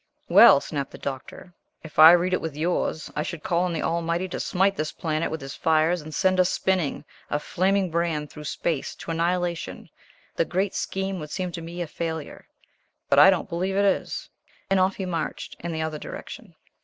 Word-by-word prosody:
"Well," - - +8
snapped 140 -3 -4
the - - -11
Doctor, 140 +6 -7 0.3
"if 155 -1 -8
I 160 +2 +11
read 180 +1 +2
it - - +1
with 160 -3 -5
yours, 160 -1 -1
I 150 - 0
should 160 0 -5
call 175 +1 +1
on 180 - -1
the 165 - -2
Almighty 170 +2 -1
to - - -4
smite 195 +2 +1
this 155 -2 -2
planet 155 -1 -2
with 160 - -5
his 135 0 -7
fires 160 +2 +2
and 155 +1 -9
send 185 +3 +2
us 180 0 +4
spinning, 185 -6 -1 0.2
a - - +1
flaming 185 +4 0
brand 160 -3 -1
through 150 0 -10
space, 150 -1 -2
to - - -7
annihilation 170 +1 -2 0.4
the - - +2
great 190 +3 -1
scheme 190 -1 -3
would 150 -1 -7
seem 180 +3 -3
to 170 - -6
me 170 +2 -5
a - - -5
failure 160 -1 -5 0.6
but - - +6
I 190 - +9
don't 185 -3 +1
believe 185 +1 -2
it 200 +1 +3
is." 195 - -1 0.4
And 195 - +4
off 185 +1 +2
he 190 - -4
marched 170 -3 -4
in 170 - -5
the 160 -1 -2
other 155 -1 -4
direction. - - -9
170 Hz, 205 wpm, -25 LUFS, 155-185 Hz, 0.6 s, I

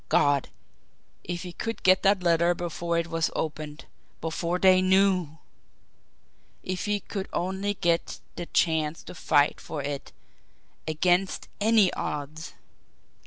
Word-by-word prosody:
God, 145 -2 +3 0.7
if 175 +1 -4
he 180 -1 -7
could 225 +4 -5
get 185 0 +5
that 195 -2 +3
letter 170 0 +3
before 170 0 -2
it 170 - +1
was 165 -1 0
opened 155 -1 -4 0.3
before 170 +2 -2
they 185 0 +5
KNEW! 185 -4 +2 1.3
If 185 0 -3
he 205 0 0
could 195 -1 -5
only 190 +3 -2
get 170 -2 0 0.2
the 175 -1 -5
chance 160 -2 +1
to - - -9
fight 145 -3 +2
for 150 -3 -5
it 140 0 -5 0.8
against 175 +4 +1
ANY 215 -3 +4
odds! 150 +3 -4
Life! - - -29
175 Hz, 130 wpm, -27 LUFS, 160-185 Hz, 1.3 s, get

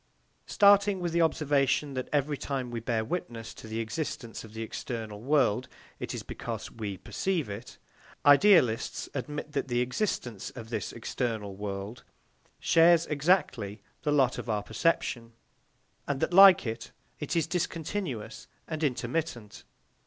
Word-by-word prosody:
Starting 200 -1 +5
with 175 -1 -2
the 170 - +3
observation 145 -3 +2
that 130 -1 -4
every 145 0 +1
time 135 -3 -4
we 120 - -3
bear 115 -1 -1
witness 120 -8 -5
to - - -11
the 110 +1 -4
existence 115 0 -4
of 110 -1 -13
the 115 - -3
external 110 -2 -6
world, 130 -3 +2 0.3
it - - -4
is - - -5
because - - -6
we 105 -4 -5
perceive 180 - -2
it, 105 +4 -8 0.5
idealists 145 - +5
admit 150 +2 -5
that 140 -2 -2
the 120 -1 0
existence 125 - -2
of 115 -2 -9
this 110 -4 -3
external 110 -3 -3
world 100 +3 -6 0.6
shares 170 0 +5
exactly 140 - 0 0.2
the 150 - 0
lot 135 -4 +3
of - - -7
our 105 -2 0
perception, 115 -1 -1 0.7
and 140 -2 -1
that 175 - -1
like 195 -4 +9
it 115 -1 -5 0.3
it - - -3
is 165 -3 +2
discontinuous 170 - -3 0.2
and 155 0 -4
intermittent. 130 -5 -2
130 Hz, 145 wpm, -29 LUFS, 110-160 Hz, 0.7 s, like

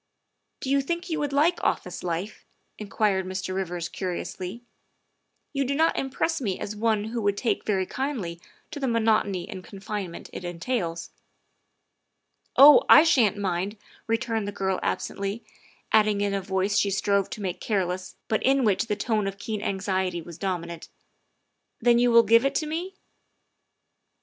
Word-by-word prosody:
Do 265 - -2
you 280 0 +4
think 340 +5 -4
you 315 - 0
would 290 -1 -1
like 310 +5 +2
office 180 0 -1
life?" 180 +4 -4 0.4
inquired 205 -2 0
Mr. 185 0 -4
Rivers 175 -3 -3
curiously. 185 +4 -5 0.5
" - - -49
You 275 -1 +1
do 275 +1 -1
not 320 +2 +3
impress 275 +4 -1
me 195 -7 -2
as 210 - -5
one 215 -1 +1
who 225 +2 -3
would 200 -1 +1
take 235 - -1
very 190 -3 +1
kindly 210 -11 -4 0.3
to - - -6
the 270 - -1
monotony 220 -5 +1
and 190 -3 -8
con 195 - -11
finement 195 -3 -5
it - - -6
entails." 175 -1 -3 0.7
" - - -52 0.7
Oh, 285 +2 +10
I 300 - +10
sha'n't 235 - +3
mind," 195 +1 -2 0.3
returned 225 -2 -1
the - - -2
girl 190 -2 -1
absently, 200 +3 -3 0.5
adding 210 -2 +4
in 200 -1 0
a 195 - -1
voice 190 +2 0
she 200 - +2
strove 200 0 +1
to 215 - -7
make 180 -2 -3
careless 185 -3 -2
but 220 - 0
in 270 0 +3
which 210 0 +2
the 210 - -1
note 215 -4 +1
of 195 0 -4
keen 210 0 -4
anxiety 190 -3 -1
was 170 0 -10
dominant, 170 -4 -4 0.3
' - - -49
' - - -52
then 240 0 +4
you 245 0 +4
will 235 0 +7
give 230 +2 +5
it 275 - 0
to 310 - 0
me?" 340 +5 -4
205 Hz, 175 wpm, -26 LUFS, 190-240 Hz, 0.7 s, Oh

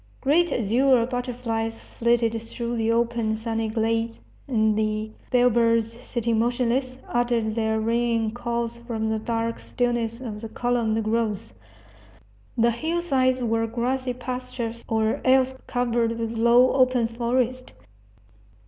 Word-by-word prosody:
Great 315 +4 +3
azure 245 +2 +3
butterflies 235 -2 -3
flitted 230 -1 +1
through 235 +1 -4
the 225 0 +1
open, 230 -1 0
sunny 225 0 -2
glades, 225 +1 0 0.3
and 220 -4 +2
the 215 0 -1 0.2
bellbirds, 230 -2 +3
sitting 235 -3 -1
motionless, 250 +2 0
uttered 240 -2 0
their 220 -1 0
ringing 230 0 +1
calls 235 0 -3
from 230 -2 -3
the 220 - 0
dark 230 +1 -2
stillness 240 -2 -1
of 220 -5 -6
the 225 - -6
columned 230 -2 0
groves. 215 - -1 1.0
The 235 +1 +4
hillsides 265 -3 0
were 225 -1 +1
grassy 250 +2 -1
pastures 250 -2 -5
or 220 0 +1
else 260 0 +4
covered 235 -2 0
with 230 0 -3
low, 235 +3 +5
open 255 -3 +3
forest. 245 +2 -1
235 Hz, 120 wpm, -24 LUFS, 225-245 Hz, 1.0 s, low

